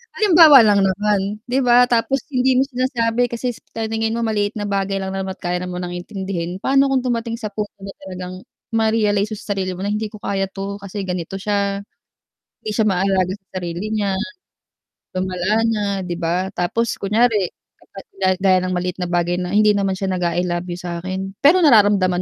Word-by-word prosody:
halimbawa 330 - +8
lang 205 -2 +4
naman 205 +1 0
'di 255 +2 +1
ba? 245 0 +6
Tapos 245 +3 +1
hindi 255 0 +2
mo - - +5
sinasabi 245 -2 0
kasi 245 +1 -2
sa 255 - -15 0.2
paningin 220 0 -1
mo 235 - -1
maliit 205 0 -1
na - - -2
bagay 195 -1 -1
lang 190 0 -4
naman 190 0 -3
at - - -42
kaya 175 0 -1
na 180 - -5
munang 180 0 -4
intindihin, 180 -1 -5
paano 275 +3 +3
kung 265 - +3
dumating 230 -2 -2
sa 220 - -3
punto 210 0 -5
na 195 0 -8
talagang, 185 0 -7 0.3
ma-realize 220 -2 +1
mo 215 - -4
sa 205 - -3
sarili 185 -1 -2
mo 180 - -7
na, - - -1
"Hindi 215 0 -2
ko 215 - -10
kaya 195 -1 -2
'to 195 +1 -5
kasi 200 0 -5
ganito 180 +1 -4
siya, 200 0 -1 0.8
hindi - - -5
siya 220 - +2
maalaga 190 -1 +1
sa 195 -1 -13
sarili 175 +3 -4
niya." 205 -3 0 1.0
Lumala 185 +4 0
na 220 -2 0 0.2
'di 175 - -3
ba, 180 +3 -1
tapos 225 +6 -1
kunyari, 210 -2 +2 0.3
kapag 195 - -13 0.2
ga 190 - +3
gaya 185 -1 +3
ng 185 0 -2
maliit 180 0 -2
na 175 - -2
bagay 175 0 0
na, 180 - -3
"Hindi 210 +2 +4
naman 195 -2 0
siya 190 -1 -2
nag-a-I 180 0 0
love 175 0 -3
you 175 - -4
sa'kin." 185 +2 -5
Pero 340 +6 +5
nararamdaman 200 -7 +4
200 Hz, 195 wpm, -20 LUFS, 185-220 Hz, 1.0 s, halimbawa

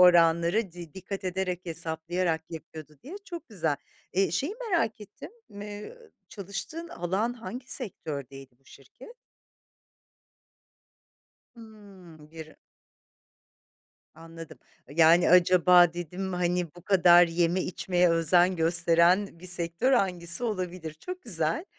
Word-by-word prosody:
oranları 170 +3 +4
di 170 -2 -11
dikkat 190 +1 -7
ederek 185 -1 -2
hesaplayarak 165 +1 -2
yapıyordu 155 -2 -10
diye. 345 +8 -9
Çok 340 -6 -9
güzel. 160 -8 -1 0.4
Eee, 190 -2 +1
şeyi 280 - -2 0.2
merak 230 - 0
ettim 210 - -11 0.2
m 205 +1 -9
eee, 210 - -9 0.3
çalıştığın 210 - -7
alan, 190 +7 -2
hangi 245 +1 -9
sektördeydi 140 - -5
bu 135 - -37
şirket? 140 - -15 2.4
Hımm 195 -9 -15
bir 160 -1 -11 1.6
Anladım. 165 0 -12 0.3
Iıı, 145 - -13
yani, 165 +1 +5
acaba 180 -1 +5
dedim, 180 +2 -5
hani, 175 -2 -1
bu 175 - -14
kadar 175 -2 +6
yeme 170 +2 0
içmeye 180 0 0
özen 175 +2 +3
gösteren 170 +3 +2
bir 185 - -11
sektör 175 +8 -1
hangisi 180 -2 +2
olabilir? 180 -6 -4
Çok 365 - -8
güzel, 165 - -1
180 Hz, 115 wpm, -27 LUFS, 165-200 Hz, 2.4 s, kadar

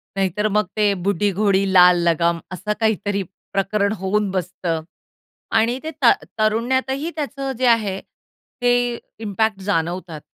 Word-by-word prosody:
नाहीतर 195 +2 0
मग 210 +1 +2
ते 210 -1 +3
बुढी 200 +1 +1
घोडी, 195 0 +2
लाल 180 -1 +7
लगाम 170 0 +2
असं 190 +3 -3
काहीतरी 205 -2 0 0.3
प्रकरण 200 +1 +1
होऊन 200 +2 0
बसतं 175 -3 -2 0.8
आणि 235 +3 +1
ते 315 - -4
ता 240 - +7 0.3
तरुण्यातही 260 +7 0
त्याचं 275 -3 -3
जे 255 - +1
आहे, 210 -5 +2 0.6
ते 245 -1 +2 0.2
इम्पॅक्ट 215 -1 -1
जाणवतात. 175 -3 -2
205 Hz, 130 wpm, -21 LUFS, 190-230 Hz, 0.8 s, लाल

